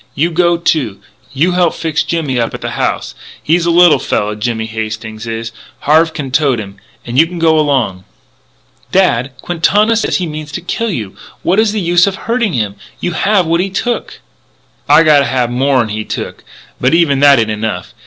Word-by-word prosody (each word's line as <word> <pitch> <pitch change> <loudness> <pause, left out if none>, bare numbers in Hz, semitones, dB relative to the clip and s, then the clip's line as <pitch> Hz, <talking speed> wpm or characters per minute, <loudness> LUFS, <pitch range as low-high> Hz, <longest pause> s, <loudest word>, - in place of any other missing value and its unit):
You 165 +5 +1
go 170 0 +2
too. 140 - 0 0.3
You 150 +7 +1
help 175 -2 +1
fix 160 -2 -1
Jimmy 150 -7 -1
up 115 - -1
at - - -8
the - - -4
house. - - -2 0.3
He's 170 +2 +1
a - - +3
little 175 -1 +5
fella, 105 0 -1
Jimmy 110 +1 -2
Hastings 110 0 -6
is. 115 0 -4 0.3
Harve 160 +3 +3
can 145 -5 -6
tote 135 -2 +2
him. 100 -2 -8 0.3
And 120 +2 0
you 165 - +5
go 160 -1 +3
along 130 -11 0 0.4
" - - -36
"Dad, 135 -9 +2
Quintana 205 +6 +2
says 225 - 0
he 185 - -2
means 155 -2 -7
to 175 - -4
kill 230 +6 -2
you! 110 - -5 0.3
What 190 +4 +2
is 220 -1 +3
the 215 - -2
use 175 0 +3
of 195 - -1
hurting 230 0 -1
him? 105 -5 -2 0.2
You 175 - -2
have 195 +2 +1
what 165 +2 +1
he 195 - -2
took 235 +6 -3 0.3
" - - -39 0.3
"I 150 +3 +7
gotta 150 -3 +5
have 120 -1 0
more'n 130 -2 +1
he 110 +1 -3
took. - - -6 0.4
But 130 +6 +2
even 155 -5 +2
that 140 -1 +6
ain't 110 -2 +1
enough. 110 +1 -4
150 Hz, 195 wpm, -14 LUFS, 115-175 Hz, 0.4 s, I